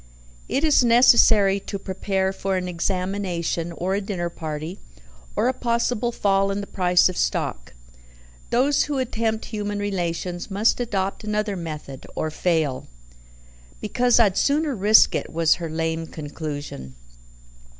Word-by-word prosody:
It 275 - 0
is 300 -4 +4
necessary 230 -4 +5
to 200 - -6
prepare 190 0 -2
for 190 0 -2
an 180 0 -3
examination, 180 -1 -2
or 180 +3 -2
a 200 - 0
dinner 180 -4 -3
party, 155 +3 -6 0.6
or 235 - +1
a 260 - +2
possible 235 -1 -1
fall 195 -3 +1
in 195 +1 -2
the 200 - -4
price 180 -2 +3
of 185 - -4
stock: - - -2 0.7
those 275 +4 +2
who 290 -1 -3
attempt 225 -3 -1
human 205 -2 -4
relations 175 -3 -3
must 205 +5 +2
adopt 195 -4 -2
another 210 -1 -1
method, 155 -6 -7
or 155 - -2
fail. 160 -5 -1 0.9
"Because 245 +3 +2
I'd 200 -5 +3
sooner 295 +1 +1
risk 210 +2 +5
it," - - -3
was 165 -1 +3
her 165 - -3
lame 160 0 -2
conclusion. 145 - -7
195 Hz, 140 wpm, -23 LUFS, 170-220 Hz, 0.9 s, necessary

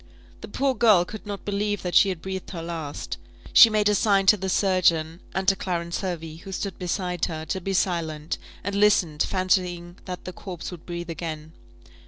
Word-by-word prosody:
The - - -7
poor 275 0 0
girl 215 -7 +5
could 215 +2 -9
not 200 -1 -6
believe 205 0 -1
that 180 -1 -3
she 200 - +6
had 180 -4 -5
breathed 190 -1 -5
her 165 -3 -6
last. 165 -4 -5 0.3
She 230 - +10
made 210 -1 +2
a 210 - +4
sign 200 -1 +3
to 200 - +7
the 190 -1 -4
surgeon, 175 -4 +2 0.2
and 190 0 -1
to 195 - +5
Clarence 170 -2 -3
Hervey, 165 -4 -4
who 195 +4 -10
stood 195 +1 -4
beside 180 -1 -1
her, 160 -1 -5
to 190 - -3
be 195 +2 -2
silent; 165 -5 -1 0.2
and 200 - -3
listened, 200 -7 +3
fancying 180 -2 0
that 180 -1 -7
the 185 - -6
corpse 180 -3 -7
would 175 -3 -11
breathe 175 -1 -5
again. 160 -2 -6
185 Hz, 195 wpm, -25 LUFS, 170-195 Hz, 0.3 s, She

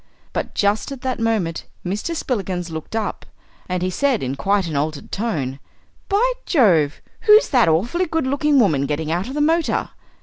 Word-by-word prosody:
But - - -3
just 205 +5 +1
at 270 -2 -7
that 260 -2 -2
moment 215 -8 -1 0.2
Mr. 210 - -2
Spillikins 190 - -2
looked 160 +6 -6
up, 220 -1 -2 0.5
and 180 0 -1
he 185 - 0
said 270 - +1
in 130 0 -2
quite 195 +8 +1
an 160 -3 -4
altered 145 +1 -2
tone. 145 - -2 0.5
"By 440 +5 +3 0.2
Jove! 175 - +3 0.2
who's 425 +1 +7
that 245 - +4
awfully 235 - +1
good 320 -2 -1
looking 285 +1 +2
woman 150 - +3
getting 150 +2 -2
out 175 +5 -1
of 265 - -6
the 295 - 0
motor?" 325 +2 +1
205 Hz, 175 wpm, -21 LUFS, -, 0.5 s, who's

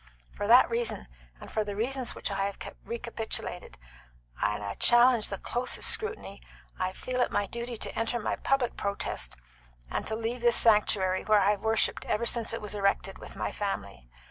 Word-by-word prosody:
For 205 - -3
that 245 +3 +8
reason, 230 - -1 0.3
and - - -11
for 215 - 0
the 205 -1 -5
reasons 250 +4 -2
which - - -3
I 195 0 0
have 200 0 -4 0.3
recapitulated 230 -6 -5 0.6
and 105 +1 0
I 100 0 -3
challenge 240 - +5
the 200 - -4
closest 245 +6 +1
scrutiny 435 - -2 0.4
I 185 0 0
felt 250 +6 -3
it - - +1
my 205 - +1
duty 235 +3 -5
to - - -5
enter 230 +1 -1
my 215 - -1
public 270 -3 0
protest 200 - -3 0.6
and - - -2
to 220 - -2
leave 230 +2 -3
this 240 -1 +5
sanctuary, 205 -4 +3
where 215 0 +4
I 200 +1 +4
have 205 - -2
worshipped 220 0 +1
ever 215 +2 0
since 235 -1 +2
it 230 - -3
was 210 - -4
erected, 200 -1 0
with - - -10
my - - -3
family. - - -5
220 Hz, 185 wpm, -29 LUFS, 200-240 Hz, 0.6 s, that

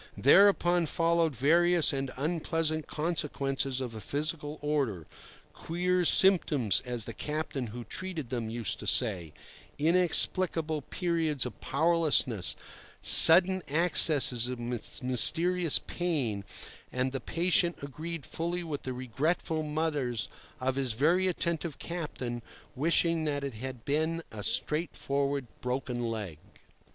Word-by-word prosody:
Thereupon 175 +1 +3
followed 165 -1 -1
various 170 +6 +2
and 135 -1 -4
unpleasant 155 +1 -3
consequences 140 -4 -4
of 125 -3 -6
a 110 - -9
physical 150 - -5
order—"queer 150 - -5
symptoms," 155 - +3
as 120 -3 -4
the 115 - -8
captain, 150 -2 -5
who 120 +3 -9
treated 165 - -7
them, 120 -3 -4
used 110 -5 -2
to - - -9
say; 95 - +1 0.5
inexplicable 165 -1 -1
periods 165 -3 -3
of 120 -5 -10
powerlessness, 150 - 0 0.5
sudden 185 +3 +9
accesses 150 -6 +5
of 125 0 -6
mysterious 145 +8 +5
pain; 135 - -4 0.5
and 130 +1 -3
the 135 - -6
patient 175 0 -1
agreed 155 +2 -8
fully 175 +2 -5
with 155 -4 -7
the 130 - -7
regretful 145 +6 -3
mutters 150 -6 -3 0.3
of 130 +1 -3
his 130 -4 -2
very 170 +10 0
attentive 170 -3 -4
captain 140 -8 -7 0.3
wishing 165 +3 0
that 145 -2 -4
it 140 -2 -6
had 125 +1 -9
been 160 +3 -2
a 110 - -9
straightforward 140 - -2 0.2
broken 125 -1 -5
leg. 100 -9 -7
150 Hz, 115 wpm, -27 LUFS, 125-170 Hz, 0.5 s, sudden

